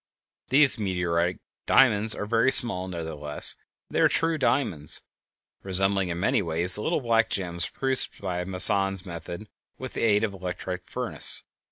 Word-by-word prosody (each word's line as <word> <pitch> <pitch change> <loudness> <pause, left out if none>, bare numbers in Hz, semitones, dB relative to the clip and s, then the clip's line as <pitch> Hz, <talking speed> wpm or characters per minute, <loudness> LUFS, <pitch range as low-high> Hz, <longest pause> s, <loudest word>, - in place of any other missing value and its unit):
_ - - -37
These 135 -2 +4
meteoric 90 -3 -2 0.3
diamonds 110 -4 +3
are - - -6
very 115 +4 +1
small; 95 -8 +5
nevertheless, 80 -4 0 0.3
they - - -4
are - - +5
true 165 -1 -1
diamonds, 85 - 0 0.6
resembling 95 0 -1
in 85 0 -5
many 120 +5 0
ways 85 +1 +2
the 105 - +1
little 160 +5 -2
black 115 -2 0
gems 90 -2 -2
produced 135 -1 0
by 90 -2 -4
Moissan's 95 0 +3
method 85 +3 -9 0.3
with 130 -1 -9
the - - -5
aid 105 -2 +1
of 110 - -2
the 95 - -13
electric 90 0 -7
furnace. - - -1
95 Hz, 160 wpm, -24 LUFS, 90-115 Hz, 0.6 s, small